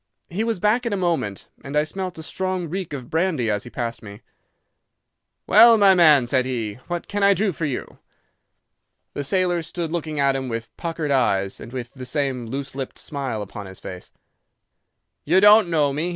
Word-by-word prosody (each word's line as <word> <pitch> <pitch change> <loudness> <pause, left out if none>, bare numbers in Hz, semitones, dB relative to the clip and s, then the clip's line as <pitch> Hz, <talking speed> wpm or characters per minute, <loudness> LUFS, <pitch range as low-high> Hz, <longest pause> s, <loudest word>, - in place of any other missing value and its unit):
He 200 +6 -1
was 225 -4 -1
back 225 +5 +2
in 225 - -1
a - - 0
moment, 165 - -2 0.2
and 140 +2 -3
I 150 - +4
smelt 185 +2 -5
a 160 - -7
strong 185 +1 -3
reek 185 +2 -4
of 130 -4 -7
brandy 160 - +1
as 105 -1 -2
he - - -8
passed 120 -1 -4
me. 100 -1 -11 1.2
"'Well, 230 +2 +7
my 200 -2 +6
man,' 155 -8 +6
said 130 +1 +1
he, 115 -4 -3
'what 175 -1 -4
can 205 0 -3
I 200 0 +5
do 205 0 +1
for 165 -1 -4
you?' 140 -4 -5 1.1
"The 145 - -3
sailor 175 +2 +1
stood 165 0 -4
looking 155 -3 -3
at 140 -1 +3
him 130 -1 -3
with 115 0 -6
puckered 165 -3 -3
eyes, 100 -7 +1
and 115 - -10
with 125 -2 -6
the 130 -2 -8
same 135 -5 -2
loose 135 +3 -5
lipped 135 -1 -6
smile 135 -8 -3
upon 100 0 -9
his 95 0 -10
face. 90 -1 -9 1.1
"'You 175 +5 +4
don't 210 -1 +7
know 150 -4 +2
me? 155 +5 -1
150 Hz, 195 wpm, -22 LUFS, 125-185 Hz, 1.2 s, Well